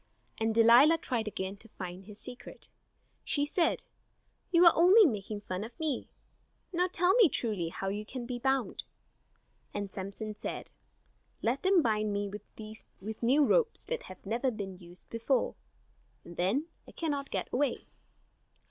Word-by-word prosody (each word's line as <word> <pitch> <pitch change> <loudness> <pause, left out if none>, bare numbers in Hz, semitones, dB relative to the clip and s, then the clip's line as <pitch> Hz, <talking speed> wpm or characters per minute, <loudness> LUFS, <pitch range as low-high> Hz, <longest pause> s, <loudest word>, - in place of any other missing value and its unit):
And 225 0 0
Delilah 240 +8 +7
tried 235 -8 -2
again 195 -1 -4
to 225 +2 -15
find 185 -1 -8
his 205 0 -10
secret. 245 +2 -9 0.6
She 285 -1 +1
said: 330 +3 +1 0.7
"You 350 0 +6
are 340 - +9
only 380 +6 +7
making 210 - -2
fun 185 -1 -4
of 230 +9 -10
me. 305 -5 -2 0.6
Now 360 +1 +2
tell 360 +2 +3
me 445 -6 +6
truly 210 -10 -1
how 195 +3 -4
you 205 +2 -3
can 245 +3 -6
be 245 0 -4
bound." 265 0 0 0.9
And 205 -1 -4
Samson 200 +3 -5
said: - - -6 0.7
"Let 245 +4 +1
them 380 -3 +4
bind 215 -2 +1
me 205 0 -1
with 215 0 -9
new 270 +5 +4
ropes 460 - +2
that 485 - -3
have 185 +1 -12
never 235 +6 0
been 195 -5 -6
used 175 0 -15
before; 230 +4 0 0.7
and 170 - -10
then 200 - +1 0.2
I - - -13
cannot 285 -4 -2
get - - -2
away." 280 +2 0
230 Hz, 155 wpm, -31 LUFS, 205-290 Hz, 0.9 s, are